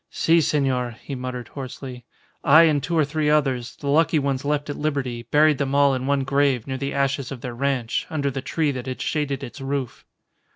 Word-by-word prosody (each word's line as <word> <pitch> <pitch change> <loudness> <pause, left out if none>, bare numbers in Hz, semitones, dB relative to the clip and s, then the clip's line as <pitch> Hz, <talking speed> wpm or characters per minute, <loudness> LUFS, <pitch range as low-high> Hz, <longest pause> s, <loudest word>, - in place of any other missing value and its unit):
"Si, 165 +1 +3
senor," 130 -5 0
he 140 - -6
muttered, 125 -2 -5
hoarsely, 130 -2 -8 0.4
"I 155 +4 +7
and 155 -3 +3
two 165 +5 -1
or 155 - +4
three 150 +1 -1
others, 135 -6 +1
the - - -11
lucky 155 +3 +3
ones 140 -2 -1
left 145 0 -1
at 145 - -4
liberty, 130 -6 -3
buried 150 0 +4
them 140 -1 -1
all 140 -1 +5
in 130 0 -2
one 140 -1 +1
grave 140 -3 +1
near 130 -1 -4
the 140 +1 -2
ashes 140 -1 0
of 130 -3 -7
their 125 0 -5
ranch, 130 -2 -1
under 145 -3 -1
the 135 - -4
tree 150 +2 0
that 130 -1 -6
had 130 - -4
shaded 145 -3 -2
its 120 +4 -8
roof." 135 -2 -3
140 Hz, 210 wpm, -23 LUFS, 130-145 Hz, 0.4 s, I